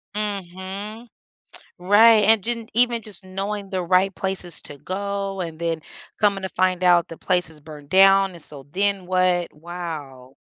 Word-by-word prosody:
Mhm, 200 Hz, +2 st, -6 dB, 0.7 s
right, 210 Hz, +4 st, +6 dB
and 220 Hz, -2 st, +5 dB
didn't 230 Hz, -1 st, -3 dB
even 240 Hz, 0 st, +2 dB
just 200 Hz, -3 st, -5 dB
knowing 195 Hz, +1 st, -4 dB
the 185 Hz, -2 st, -2 dB
right 185 Hz, +3 st, +3 dB
places 190 Hz, -3 st, -3 dB
to 145 Hz, -, -8 dB
go 195 Hz, +1 st, -4 dB
and 165 Hz, -2 st, -6 dB
then 165 Hz, -1 st, -1 dB, 0.4 s
coming 200 Hz, -2 st, +2 dB
to 190 Hz, -, -3 dB
find 185 Hz, -1 st, 0 dB
out 175 Hz, -1 st, +5 dB
the 165 Hz, -, -10 dB
place 180 Hz, -1 st, 0 dB
is 155 Hz, -2 st, -11 dB
burned 150 Hz, -1 st, -12 dB
down, 195 Hz, +1 st, +5 dB
and 170 Hz, -3 st, -12 dB
so, 140 Hz, -2 st, -9 dB
then 195 Hz, 0 st, 0 dB
what? 185 Hz, -1 st, +1 dB
Wow. 150 Hz, -6 st, -8 dB
185 Hz, 160 wpm, -22 LUFS, 175-200 Hz, 0.7 s, right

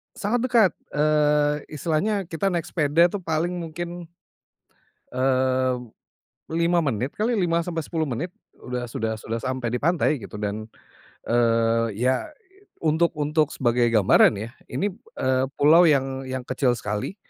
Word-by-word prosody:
sangat 225 Hz, +4 st, 0 dB
dekat, 225 Hz, -8 st, +4 dB, 0.2 s
eee, 150 Hz, 0 st, +3 dB
istilahnya 170 Hz, +7 st, -1 dB
kita 165 Hz, +4 st, -1 dB
naik 175 Hz, -3 st, 0 dB
sepeda 165 Hz, +2 st, +3 dB
tuh 205 Hz, -, -3 dB
paling 165 Hz, 0 st, -1 dB
mungkin 170 Hz, +1 st, -6 dB, 1.1 s
eee, 130 Hz, 0 st, +1 dB, 0.8 s
5 170 Hz, +1 st, +2 dB
menit 130 Hz, 0 st, -1 dB
kali, 230 Hz, +3 st, +1 dB
5-10 165 Hz, -3 st, -1 dB
menit 140 Hz, +8 st, -3 dB, 0.3 s
udah 125 Hz, -1 st, -4 dB
sudah 110 Hz, -1 st, -3 dB
sudah 115 Hz, +2 st, -5 dB
sampai 130 Hz, -2 st, -2 dB
di -, -, 0 dB
pantai, 155 Hz, -5 st, +1 dB
gitu, 105 Hz, -, -8 dB
dan, 105 Hz, +1 st, -4 dB, 0.5 s
eee, 115 Hz, -2 st, +2 dB
ya, 130 Hz, +2 st, 0 dB, 0.6 s
untuk 160 Hz, +2 st, +3 dB
untuk 150 Hz, 0 st, +1 dB
sebagai 120 Hz, -1 st, +2 dB
gambaran, 110 Hz, -1 st, +5 dB
ya. 110 Hz, +3 st, -5 dB, 0.2 s
Ini, 180 Hz, +11 st, -2 dB, 0.2 s
eee, 130 Hz, 0 st, +1 dB
pulau 165 Hz, +4 st, +6 dB
yang 135 Hz, -2 st, 0 dB
yang 130 Hz, -1 st, -4 dB
kecil 130 Hz, -1 st, 0 dB
sekali. 105 Hz, -, -4 dB
145 Hz, 130 wpm, -24 LUFS, 120-170 Hz, 1.1 s, pulau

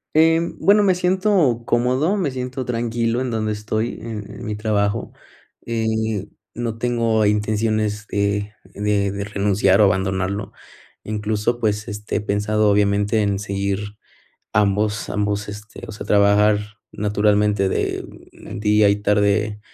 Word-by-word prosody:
Em, 165 Hz, +2 st, +3 dB
bueno, 205 Hz, +2 st, +5 dB
me 190 Hz, -3 st, +3 dB
siento 180 Hz, -, +2 dB
cómodo. 130 Hz, +10 st, +1 dB
Me 180 Hz, -9 st, 0 dB
siento 130 Hz, 0 st, -4 dB
tranquilo 115 Hz, 0 st, -1 dB
en 130 Hz, -1 st, -2 dB
donde 110 Hz, -1 st, -1 dB
estoy, 110 Hz, +2 st, -3 dB
en 110 Hz, -3 st, -6 dB
en 105 Hz, -, -9 dB
mi 105 Hz, -1 st, -3 dB
trabajo 105 Hz, -1 st, -1 dB, 0.5 s
y 110 Hz, -3 st, -1 dB, 0.3 s
no 115 Hz, -1 st, -4 dB
tengo 115 Hz, -2 st, +1 dB
intenciones 105 Hz, 0 st, 0 dB
de 100 Hz, 0 st, -1 dB, 0.2 s
de 100 Hz, -1 st, 0 dB
de 100 Hz, 0 st, -4 dB
renunciar 100 Hz, -1 st, +2 dB
o -, -, +7 dB
abandonarlo. 95 Hz, +1 st, 0 dB, 0.5 s
Incluso, 110 Hz, +2 st, -1 dB
pues, 105 Hz, -1 st, 0 dB
este, 105 Hz, +1 st, -4 dB
he -, -, 0 dB
pensado, 105 Hz, +1 st, +1 dB
obviamente, 100 Hz, +1 st, +2 dB
en 100 Hz, -1 st, 0 dB
seguir 100 Hz, +1 st, -3 dB, 0.6 s
ambos 105 Hz, +1 st, +1 dB
ambos 105 Hz, 0 st, -1 dB
este, 105 Hz, +1 st, -10 dB
o -, -, -7 dB
sea, 105 Hz, -, -8 dB
trabajar 105 Hz, +1 st, +3 dB, 0.2 s
naturalmente 105 Hz, -1 st, +2 dB
de -, -, -2 dB, 0.5 s
día 105 Hz, -1 st, +3 dB
y 100 Hz, -, +3 dB
tarde 105 Hz, +1 st, +1 dB
105 Hz, 135 wpm, -21 LUFS, 105-115 Hz, 0.6 s, o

